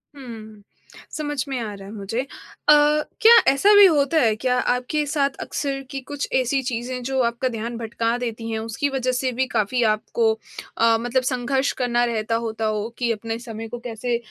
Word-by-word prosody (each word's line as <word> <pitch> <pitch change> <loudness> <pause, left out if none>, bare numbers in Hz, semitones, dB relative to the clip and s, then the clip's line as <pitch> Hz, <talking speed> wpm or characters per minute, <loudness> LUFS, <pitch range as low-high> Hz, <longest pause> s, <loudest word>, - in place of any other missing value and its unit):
हुँ, 220 -6 -10 0.6
समझ 295 -3 -2
में 265 -2 -3
आ 220 -3 -4
रहा 195 -1 -10
है 205 - -9
मुझे। 215 +3 -3
अ, - - -7 1.0
क्या 455 +2 +9 0.2
ऐसा 390 +10 +4
भी 410 0 +9
होता 315 -2 +3
है 220 -4 +3
क्या 250 +3 0
आपके 250 +6 0
साथ 280 -2 0
अक्सर 275 -2 -3
कि 275 - -4
कुछ 290 -1 -4
ऐसी 260 +1 +1
चीज़ें 250 0 -3
जो 265 +1 -1
आपका 235 +2 0
ध्यान 230 0 -5
भटका 230 +1 -1
देती 230 -2 -5
हैं 220 - -2
उसकी 225 +6 -2
वजह 260 -2 -1
से 255 +1 -1
भी 260 +2 0
काफ़ी 235 +3 +1
आपको 220 +1 0 0.4
अ, 230 0 +4
मतलब 245 +2 0
संघर्ष 260 +1 0
करना 240 -1 +2
रहता 230 -1 -1
होता 220 0 -3
हो 215 0 -1
कि 240 -2 0
अपने 225 +1 -4
समय 225 -2 -7
को 240 +2 -7
कैसे 240 0 -3
240 Hz, 190 wpm, -22 LUFS, 225-265 Hz, 1.0 s, क्या